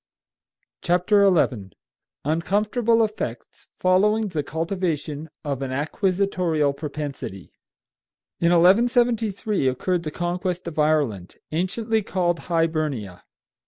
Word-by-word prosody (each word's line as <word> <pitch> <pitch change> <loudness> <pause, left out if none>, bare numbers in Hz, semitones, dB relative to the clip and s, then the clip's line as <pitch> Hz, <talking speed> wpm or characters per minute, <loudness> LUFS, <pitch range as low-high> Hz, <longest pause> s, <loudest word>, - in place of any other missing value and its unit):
CONQUEST 180 +3 0
OF 210 - +7
IRELAND: 130 - +2 0.5
UNCOMFORTABLE 210 - +2
EFFECTS 125 - -5
FOLLOWING 210 +4 +2
THE 160 -5 -2
CULTIVATION 160 -2 -3 0.2
OF 140 -2 -2
AN 135 -1 -3
ACQUISITORIAL 170 0 0
PROPENSITY. 140 - -6 0.9
In 170 - +3
1173 215 - +3
occurred 170 +8 0
the 155 - -4
conquest 175 +2 -3
of 155 -2 -5
Ireland, 145 - +1 0.2
anciently 215 +7 0
called 175 -3 0
Hibernia. 155 - -1
170 Hz, 95 wpm, -23 LUFS, 150-200 Hz, 0.9 s, OF